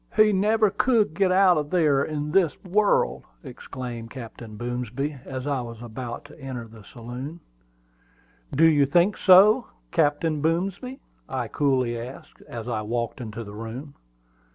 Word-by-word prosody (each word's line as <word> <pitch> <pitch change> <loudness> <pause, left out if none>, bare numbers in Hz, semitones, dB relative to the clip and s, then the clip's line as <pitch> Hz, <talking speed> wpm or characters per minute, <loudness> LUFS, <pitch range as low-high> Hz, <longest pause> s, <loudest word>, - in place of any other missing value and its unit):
"He 215 -1 +5
never 210 +2 +3
could 215 -3 +2
get 185 +2 +2
out 185 -2 +5
of 145 -1 -4
there 150 -6 +3
in 150 0 -3
this 175 -3 +3
world!" 205 +3 +2 0.2
exclaimed 125 -3 -7
Captain 115 -3 -9
Boomsby, 125 +4 -3
as 130 -1 -5
I 140 -3 0
was 115 -2 -8
about 120 +1 -7
to 145 +2 -15
enter 130 -4 -6
the 110 -1 -14
saloon. 125 - -8 1.1
"Do 160 +4 +4
you 145 -4 +5
think 175 +7 +3
so, 210 +6 +6 0.2
Captain 150 -1 +1
Boomsby?" 190 - -1 0.3
I 130 -3 -2
coolly 130 -5 +1
asked, 125 +3 -10
as 115 -1 -6
I 115 -3 -2
walked 115 +4 -3
into 115 0 -6
the 105 -1 -10
room. 115 +7 -7
140 Hz, 150 wpm, -25 LUFS, 120-175 Hz, 1.1 s, so